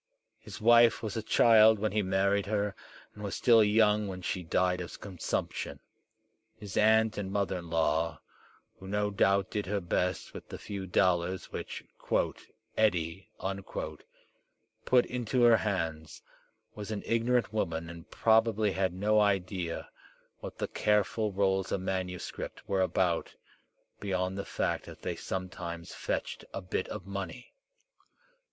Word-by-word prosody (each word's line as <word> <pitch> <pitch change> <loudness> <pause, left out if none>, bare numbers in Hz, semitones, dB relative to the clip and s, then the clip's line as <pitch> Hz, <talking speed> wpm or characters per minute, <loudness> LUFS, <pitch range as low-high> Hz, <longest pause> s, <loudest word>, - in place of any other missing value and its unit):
His - - -10
wife 115 +1 +5
was 110 - -3
a 110 - -1
child 110 0 +6
when 110 +1 -1
he 105 - +1
married 100 +1 +1
her, 105 -1 0 0.4
and 105 - -10
was 100 - -3
still 115 -3 +6
young 105 0 +3
when 90 -1 -6
she 90 - -2
died 90 +2 +1
of 85 - -8
consumption. 95 -5 -3 0.8
His 105 -4 -9
aunt 110 0 +4
and 95 -2 -4
mother 100 -2 0
in 85 -1 -10
law, 80 0 +1 0.6
who 95 - -10
no 105 +1 0
doubt 100 0 +2
did 105 -2 -2
her 100 +1 0
best 90 0 -1
with - - -10
the - - -6
few 100 -2 -6
dollars 90 0 +1
which - - -6 0.9
"Eddie" 90 -4 0 1.6
put 125 -1 +5
into 125 0 0
her 120 -1 +7
hands, 80 -7 -3 0.5
was 105 0 -7
an 105 -2 -4
ignorant 115 0 +1
woman 85 -6 -1
and 85 0 -10
probably 110 -2 +3
had 95 -1 0
no 105 +3 +3
idea 95 -4 0 0.5
what - - -8
the - - -2
careful 105 +1 +1
rolls 95 -1 +1
of - - 0
manuscript 95 -1 -4
were 95 -1 +1
about, 90 -2 0 0.6
beyond 95 -2 -1
the 100 - -4
fact - - -2
that - - -11
they - - -2
sometimes 90 -2 -5
fetched - - -3
a 95 - -3
bit 95 0 -2
of 90 - -7
money. 100 +5 -6
100 Hz, 145 wpm, -30 LUFS, 90-105 Hz, 1.6 s, her